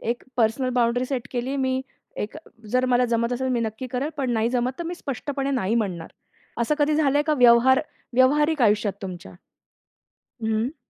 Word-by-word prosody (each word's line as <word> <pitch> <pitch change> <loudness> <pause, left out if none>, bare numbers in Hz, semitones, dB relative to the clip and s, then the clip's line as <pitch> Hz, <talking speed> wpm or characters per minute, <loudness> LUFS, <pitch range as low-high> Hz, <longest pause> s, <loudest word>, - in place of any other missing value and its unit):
एक 235 +2 -3
personal 240 +2 +1
boundary 245 0 +2
set 255 -2 -3
केली 255 +2 -2
मी. 260 -1 0 0.4
एक 210 - -4 0.4
जर 255 0 +3
मला 250 0 +3
जमत 235 0 0
असेल 260 +1 -2
तर 260 - 0
मी 240 - 0
नक्की 220 +3 -4
करेल, 255 +3 -2
पण 265 -3 -1
नाही 225 0 +1
जमत 250 0 0
तर 340 - -4
मी 345 - -4
स्पष्टपणे 275 -2 -4
नाही 230 -6 0
म्हणणार. 185 -8 -2 0.5
असं 270 +6 +1
कधी 295 +1 +2
झालंय 290 -1 +3
का 305 0 +1
व्यवहार 245 +2 +6 0.3
व्यवहारिक 295 +3 +3
आयुष्यात 210 -2 +3
तुमच्या? 180 - -7 1.1
हं. 220 +7 -1
250 Hz, 175 wpm, -24 LUFS, 230-270 Hz, 1.1 s, व्यवहार